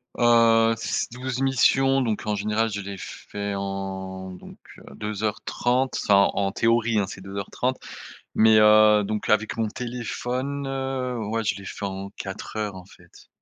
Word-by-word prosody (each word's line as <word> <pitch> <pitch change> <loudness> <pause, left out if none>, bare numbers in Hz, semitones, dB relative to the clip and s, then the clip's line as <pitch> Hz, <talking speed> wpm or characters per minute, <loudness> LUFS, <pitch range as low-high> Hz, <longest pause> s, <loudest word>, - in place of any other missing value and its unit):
Heu, 115 -1 +5
s - - -2
12 125 +1 -4
missions 135 0 +3
donc 110 -4 -2
en 105 -1 0
général 105 +2 0
je 100 0 -3
les 100 0 -6
fais 100 +2 -6
en 95 -1 -5
donc 90 - -12 0.2
heu, - - -16
2 105 0 -5
heures 105 -1 -1
30, 125 +2 0
enfin, 100 -1 +5
en 100 -1 0
théorie, 115 +1 +2
hein, 100 - +1
c'est 95 - -9
2 95 +1 -9
heures 100 -1 -5
30 130 +1 -1 0.6
mais 110 0 +6
heu 105 0 +6
donc 105 +1 -3
avec 110 0 +2
mon 115 -1 0
téléphone, 125 +4 -4
heu, 135 -2 -3
ouais, 110 +1 -2
je 100 -2 0
les 100 - -10
fait 100 - -6
en 95 0 -5
4 95 +2 -7
heures 105 -3 -3
en 95 - -10
fait, 85 -2 -19
110 Hz, 180 wpm, -24 LUFS, 100-120 Hz, 0.6 s, mais